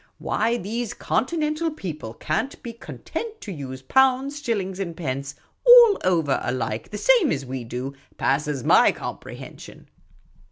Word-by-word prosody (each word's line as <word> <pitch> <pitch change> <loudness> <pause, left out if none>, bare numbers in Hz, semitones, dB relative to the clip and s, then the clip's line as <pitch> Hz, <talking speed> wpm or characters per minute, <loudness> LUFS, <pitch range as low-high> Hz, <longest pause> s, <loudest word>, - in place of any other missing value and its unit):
Why 230 +3 0
these 230 +3 -4
Continental 310 +3 -1
people 155 - -7
can't 160 - -3
be 235 - -6
content 440 - -7
to 205 - -7
use 130 -5 -7
pounds, 265 - +2
shillings, 200 -8 -2
and 170 -4 -4
pence, 140 -3 -4 0.3
all 480 -4 +8
over 165 -7 +1
alike^ 115 -3 -3
the 210 - -5
same 465 - +4
as 140 -2 -2
we 130 -1 -5
do, 125 +4 -5 0.2
passes 140 -1 0
7ny - - +5
comprehension. - - -9
190 Hz, 135 wpm, -24 LUFS, -, 0.3 s, all